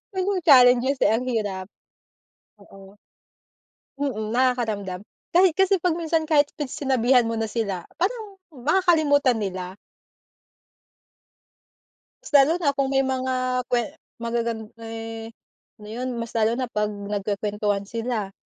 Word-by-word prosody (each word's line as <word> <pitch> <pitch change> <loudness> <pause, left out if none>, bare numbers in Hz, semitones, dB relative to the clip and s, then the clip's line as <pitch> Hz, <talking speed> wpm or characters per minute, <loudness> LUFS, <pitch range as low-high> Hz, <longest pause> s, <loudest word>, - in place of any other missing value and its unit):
Mhm, 380 0 0
challenges 255 0 +6
eh, - - +4
ang 250 +3 0
hirap. 205 -6 -2 0.9
Oo. 195 0 -16 1.0
Mm, 220 -7 -2
nakakaramdam. 220 -7 0 0.3
Kahit 360 -1 +5
kasi 385 -2 +3
pag 345 -2 +1
minsan, 320 -1 -1
kahit 290 -2 +3
pinagsinabihan 260 -4 +1
mo 230 - -2
na 225 -1 -2
sila, 200 -6 -2 0.2
parang 405 +2 -2 0.2
makakalimutan 290 -3 +2
nila. 185 -1 -5 2.5
Mas - - -11
lalo 280 +3 +7
na 290 -5 +1
kung 275 -1 0
may 270 - +3
mga 260 0 -2 0.4
kwe 245 -1 +2 0.4
magagan 235 -1 -2 0.2
eh, 225 0 -7 0.5
ano 210 - -13
yun, 255 +2 -3
mas 230 -1 -6
lalo 220 0 +3
na 255 - -1
pag 210 0 +1
nagkukwentuhan 205 0 -2
sila. 225 -2 -3
240 Hz, 120 wpm, -24 LUFS, 210-285 Hz, 2.5 s, lalo